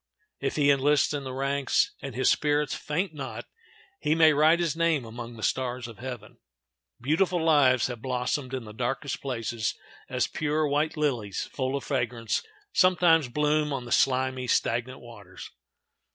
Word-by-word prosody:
If 135 - -2
he 145 -1 +4
enlists 140 +1 +3
in 140 -2 -3
the 130 - -5
ranks, 140 +1 +1
and 135 -4 -7
his 130 - +3
spirits 150 0 +1
faint 165 +4 -2
not, 140 -3 -6 0.5
he 150 +1 +1
may 160 -1 +6
write 155 +3 +4
his 170 -4 0
name 165 -6 +1
among 120 +1 -8
the 110 - -9
stars 125 -2 -1
of 115 -3 -12
heaven. 120 -4 -8 0.6
Beautiful 170 +7 +1
lives 140 -6 +4
have 120 -3 -5
blossomed 130 +1 -2
in 130 - -5
the 105 -1 -10
darkest 125 +4 -3
places, 115 -4 -2 0.3
as - - +1
pure, 155 0 -1
white 150 +3 0
lilies, 120 -10 -1
full 130 0 -1
of 140 - -3
fragrance, 120 -4 -1 0.3
sometimes 175 -5 +4
bloom 150 +3 +1
on 130 -3 -3
the 120 - -9
slimy, 130 0 +1
stagnant 120 +2 0
waters. 115 -4 -12
135 Hz, 160 wpm, -27 LUFS, 125-150 Hz, 0.6 s, may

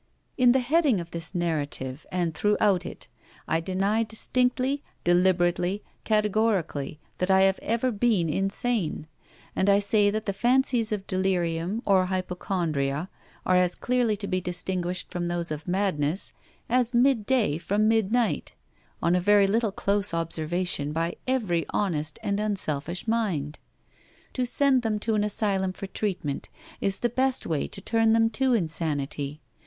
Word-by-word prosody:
In 250 -1 +5
the 260 - +4
heading 280 - +2
of 170 -1 -7
this 165 +2 -3
narrative, 145 -5 -3
and 175 -3 -1
throughout 205 0 +2
it, - - -8 0.4
I 160 - +1
deny 195 +5 0
distinctly, 250 +5 0 0.2
deliberately, 175 +2 +2 0.2
categorically, 210 -9 0 0.2
that 180 - 0
I 190 0 +5
have 195 0 +3
ever 235 +3 0
been 210 -5 +1
insane; 195 0 -1 0.5
and 190 - +2
I 200 - +6
say 205 0 +3
that 215 +1 -2
the 200 - -1
fancies 240 +1 +2
of 205 -2 -2
delirium 185 +2 -1
or 190 -2 +3
hypochondria 180 -5 -2 0.3
are 185 - +3
as 180 -1 +3
clearly 245 -4 +1
to 200 0 -3
be 185 -1 -1
distinguished 180 0 -3
from 175 -1 -2
those 175 -1 -1
of 155 +2 -5
madness 180 -3 -1 0.3
as 245 0 +1
midday 240 - +2
from 205 +5 +1
midnight, 225 +1 +1 0.5
on 170 - +3
a 180 - +2
very 205 +1 +5
little 220 +2 +1
close 200 -2 0
observation, 165 -2 -1
by 165 +2 -1
every 210 -11 +1
honest 155 -6 -1
and 200 0 -1
unselfish 180 -4 -2
mind. 185 -11 -1 0.7
To 255 -1 -1
send 270 0 +3
them 220 -2 -1
to 220 +1 -1
an 210 -1 +2
asylum 195 -3 0
for 195 - -7
treatment 190 -8 -3 0.3
is 195 -1 0
the 240 - +2
best 260 +2 0
way 155 -4 -1
to 195 - -8
turn 225 +2 +2
them 225 0 +3
to 260 +3 +1
insanity. 155 -5 -2
195 Hz, 150 wpm, -26 LUFS, 170-220 Hz, 0.7 s, I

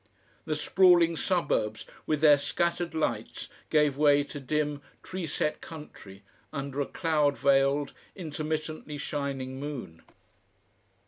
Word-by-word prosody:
The 155 - -1
sprawling 175 +1 +5
suburbs 150 - 0 0.2
with 155 -2 0
their 150 -2 +7
scattered 170 +3 -1
lights 160 - -2 0.2
gave 150 -3 +3
way 145 -1 +5
to 145 0 -8
dim 145 +1 -1 0.2
tree 185 -2 -5
set 150 +1 -1
country 105 -11 -11 0.3
under 140 0 -3
a 140 - -1
cloud 150 -4 +1
veiled, 140 +1 +2 0.2
intermittently 155 -2 -4
shining 135 -2 -4
moon. 135 - -6
150 Hz, 115 wpm, -28 LUFS, 140-160 Hz, 0.3 s, their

